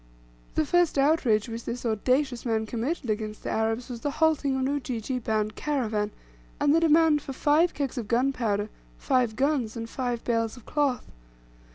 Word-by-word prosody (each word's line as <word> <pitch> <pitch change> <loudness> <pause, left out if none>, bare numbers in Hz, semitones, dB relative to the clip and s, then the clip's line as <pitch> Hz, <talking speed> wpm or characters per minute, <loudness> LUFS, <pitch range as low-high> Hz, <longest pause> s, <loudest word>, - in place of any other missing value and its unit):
The 315 - +2
first 350 -1 +2
outrage 275 -7 +3
which 230 0 -6
this 245 +1 -5
audacious 250 +3 +1
man 225 -2 0
committed 245 +6 -3
against 215 0 -3
the - - -3
Arabs 225 +2 -1
was 240 -2 -7
the 290 - -1
halting 310 -4 +2
of 265 - -1
an 260 - +1
Ujiji 255 -2 -3
bound 215 -2 -1
caravan, 220 -8 -1 0.5
and 290 - +3
the 325 - +5
demand 320 -2 +4
for 270 - -6
five 300 +6 +2
kegs 275 -3 -2
of 225 - -5
gunpowder, 235 -4 0 0.3
five 240 - +1
guns, 260 -4 0
and 230 0 -4
five 245 -1 -3
bales 230 0 -1
of 245 - -14
cloth. 285 -5 0
250 Hz, 175 wpm, -27 LUFS, 225-290 Hz, 0.5 s, the